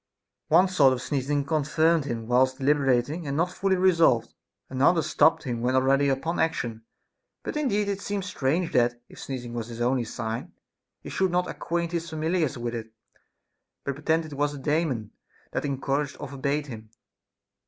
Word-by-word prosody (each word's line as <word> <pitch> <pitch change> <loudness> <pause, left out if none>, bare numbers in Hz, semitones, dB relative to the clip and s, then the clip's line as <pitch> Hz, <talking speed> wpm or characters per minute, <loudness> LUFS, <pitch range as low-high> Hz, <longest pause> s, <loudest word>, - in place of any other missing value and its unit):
One 175 +5 +5
sort 145 -8 +4
of 125 - -4
sneezing 140 0 -1
confirmed 155 +1 +2
him 115 -4 -4
whilst 130 +2 +2
deliberating 140 +2 +1
and 140 +1 -2
not 175 +2 +1
fully 190 +1 +1
resolved; 165 -11 +3 0.3
another 145 +6 +3
stopped 160 +3 +3
him 120 -4 -3
when 125 +2 +1
al 130 - +4
ready 135 +1 +3
upon 150 +6 -1
action. 120 -8 -1 0.6
But - - -4
indeed 210 -9 +1
it 200 0 -2
seems 200 -2 -3
strange 165 0 -1
that, 120 -2 +2
if - - -13
sneezing 125 -3 -6
was 115 -2 -4
his 115 -1 -8
only 125 0 +1
sign, 115 +1 -5 0.5
he - - -8
should 190 -1 +1
not 180 +1 +1
acquaint 170 0 -2
his 170 -1 -3
fam 160 -1 -5
iliars 160 -4 0
with 120 0 -3
it, 115 -1 -6 0.9
but 140 - -2
pretend 160 +4 0
that 155 - -10
it - - -6
was 145 +1 0
a - - -7
Daemon 140 -6 -1 0.4
that - - -2
en 140 -2 -2
couraged 140 +1 -1
or - - -5
forbade 140 +2 -1
him. 110 -5 -9
140 Hz, 185 wpm, -26 LUFS, 125-165 Hz, 0.9 s, One